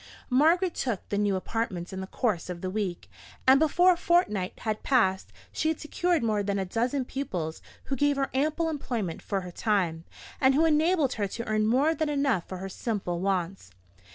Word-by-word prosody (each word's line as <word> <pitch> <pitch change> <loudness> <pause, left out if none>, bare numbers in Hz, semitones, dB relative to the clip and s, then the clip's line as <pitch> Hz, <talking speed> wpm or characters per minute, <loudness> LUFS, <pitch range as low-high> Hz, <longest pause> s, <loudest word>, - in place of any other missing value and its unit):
Margaret 330 +7 +4
took 235 -7 -3
the 200 - -1
new 205 -2 +2
apartments 190 -3 -3
in 190 - -4
the 190 - -6
course 195 -6 -1
of 175 -1 -5
the 185 - -3
week; 195 -4 -3 0.4
and 265 +1 +7
before 350 +4 +5
a - - -6
fortnight 330 - +1
had 215 -1 -2
passed, 190 -8 +1 0.2
she 315 - -1
had 320 -1 0
secured 340 0 0
more 215 -2 +1
than 200 0 -1
a 190 - -1
dozen 245 +7 -1
pupils, 180 - -4 0.2
who 270 - -3
gave 290 +2 +2
her 275 0 -1
ample 305 +5 +1
employment 240 - -3
for 195 -2 -2
her 180 -1 -8
time; 175 -5 0 0.4
and 265 0 +4
who 320 +3 +4
enabled 315 -2 +3
her 200 - +1
to 230 +4 -6
earn 215 0 +1
more 275 +8 +3
than 315 -1 -1
enough 275 - 0
for 185 - -6
her 190 +1 -5
simple 190 -3 -3
wants. 185 - -2
225 Hz, 195 wpm, -27 LUFS, 190-290 Hz, 0.4 s, and